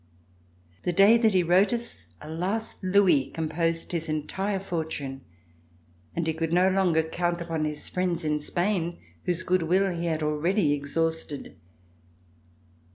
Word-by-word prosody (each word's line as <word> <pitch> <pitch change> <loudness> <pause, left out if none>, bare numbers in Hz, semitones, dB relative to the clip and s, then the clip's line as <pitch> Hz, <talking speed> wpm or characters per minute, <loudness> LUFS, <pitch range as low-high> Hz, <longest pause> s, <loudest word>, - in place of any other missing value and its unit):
The 175 - 0
day 200 +5 +7
that 220 -3 +3
he 180 - +4
wrote 180 +6 +4
us, 235 - -5
a 150 - -9
last 190 +8 -3
louis 185 -8 +4
composed 165 +1 -1
his 165 -2 -2
entire 190 +6 -2
fortune, 160 -7 -4 0.9
and 170 - -1
he 160 - 0
could 160 0 -2
no 180 +2 +4
longer 180 -4 +3
count 175 +2 -1
upon 165 -2 -2
his 150 -1 -4
friends 180 -2 -1
in 150 0 +1
Spain, 175 +1 -1 0.3
whose 180 0 -1
good 185 0 +2
will 185 +4 +2
he 170 0 -2
had 160 -1 -1
already 150 +2 +1
exhausted. 150 +1 -2
170 Hz, 145 wpm, -27 LUFS, 160-185 Hz, 0.9 s, day